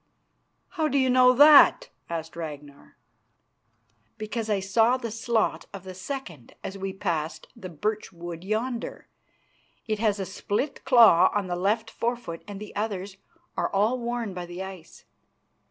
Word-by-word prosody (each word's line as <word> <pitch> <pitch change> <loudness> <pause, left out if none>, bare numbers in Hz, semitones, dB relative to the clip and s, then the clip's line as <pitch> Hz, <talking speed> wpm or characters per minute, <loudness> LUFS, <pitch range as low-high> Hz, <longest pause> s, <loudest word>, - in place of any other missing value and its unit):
"How 315 -1 -1
do 280 - 0
you 260 -1 +3
know 255 0 +6
that?" 290 +2 +7 0.2
asked 165 -1 -5
Ragnar. 145 -4 -9 1.2
"Because 220 0 -4
I 205 -2 +1
saw 225 +6 +2
the 235 -3 -5
slot 225 0 -1
of 190 - -9
the 190 -1 -8
second 185 - -7
as 190 - -5
we 195 0 -4
passed 170 -5 -3
the 190 -6 -8
birch 210 +6 -3
wood 170 -1 -8
yonder. 230 +4 -3 0.8
It 215 -2 -2
has 210 -2 +1
a 195 - -2
split 205 +9 -3
claw 225 -9 +7
on 205 -2 0
the 180 -1 -3
left 215 +5 0
forefoot 230 -9 -3
and 200 -1 -7
the 210 - -10
others 200 -2 -4 0.4
are - - -1
all 215 +6 +1
worn 235 -3 -3
by 180 -1 -6
the 175 +2 -6
ice." 190 -4 -11
205 Hz, 155 wpm, -26 LUFS, 180-235 Hz, 1.2 s, that